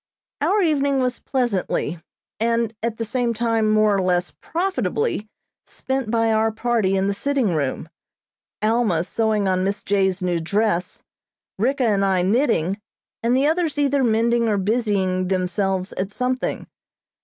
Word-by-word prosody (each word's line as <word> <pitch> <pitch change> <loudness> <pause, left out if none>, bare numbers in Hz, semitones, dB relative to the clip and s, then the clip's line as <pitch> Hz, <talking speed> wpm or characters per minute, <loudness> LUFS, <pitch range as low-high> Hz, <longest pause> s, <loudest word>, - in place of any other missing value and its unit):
Our 410 0 +2
evening 280 -4 +2
was 250 -1 -1
pleasantly, 200 - -1 0.4
and 230 0 +1
at 230 0 -2
the 230 - -2
same 235 +1 -1
time 225 -1 +1
more 215 -1 +4
or 195 - +1
less 180 -1 0
profitably 375 - -2 0.4
spent 265 -3 -3
by 225 0 +2
our 220 0 +2
party 220 -4 0
in 190 - +1
the 200 - +1
sitting 260 -3 0
room, 140 -4 -2 0.8
Alma 215 -7 +2
sewing 215 +1 0
on 185 0 +1
Miss 200 +1 -2
J.'s 190 -2 +1
new 175 -2 0
dress, 190 +1 -1 0.6
Ricka 265 +5 +1
and 205 -3 +2
I 190 -2 +2
knitting, 205 - +1 0.4
and 240 +2 +2
the 270 - +2
others 320 -1 +1
either 280 -1 +2
mending 235 0 +2
or 210 - +1
busying 195 -3 0
themselves 190 0 -1
at 190 +2 -3
something. 255 +3 -2
220 Hz, 145 wpm, -22 LUFS, 190-245 Hz, 0.8 s, more